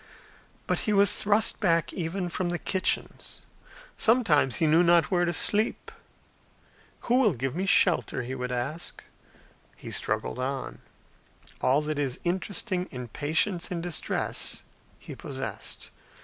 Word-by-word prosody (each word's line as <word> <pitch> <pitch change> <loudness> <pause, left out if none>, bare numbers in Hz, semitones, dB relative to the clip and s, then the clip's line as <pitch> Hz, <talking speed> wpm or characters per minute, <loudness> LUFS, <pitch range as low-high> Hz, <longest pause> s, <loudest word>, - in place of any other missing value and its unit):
But - - 0
he - - +3
was 200 0 +6
thrust 210 +2 +2
back 165 -5 +1
even 180 +2 -3
from 175 +1 -2
the 175 - -1
kitchens. 190 +2 -1 0.6
Sometimes 175 - +3
he 165 - +1
knew 160 +2 +5
not 170 0 +4
where 175 -1 +2
to 175 - 0
sleep. 210 +6 +2 1.1
"Who 245 +2 +2
will 220 -8 +4
give 135 +1 -3
me 190 +2 -2
shelter?" 130 - +3
he 125 +2 -5
would 125 -1 -4
ask. 140 +8 -4 0.7
He - - -9
struggled - - -2
on. 135 +1 -4 0.8
All 140 +4 +3
that 150 -1 -2
is 135 -3 -2
interesting 185 +1 -1
in 125 -2 -7
patience 160 - 0
in 175 - -3
distress 170 -3 -2 0.3
he - - -10
possessed. - - -5
170 Hz, 135 wpm, -27 LUFS, 140-190 Hz, 1.1 s, was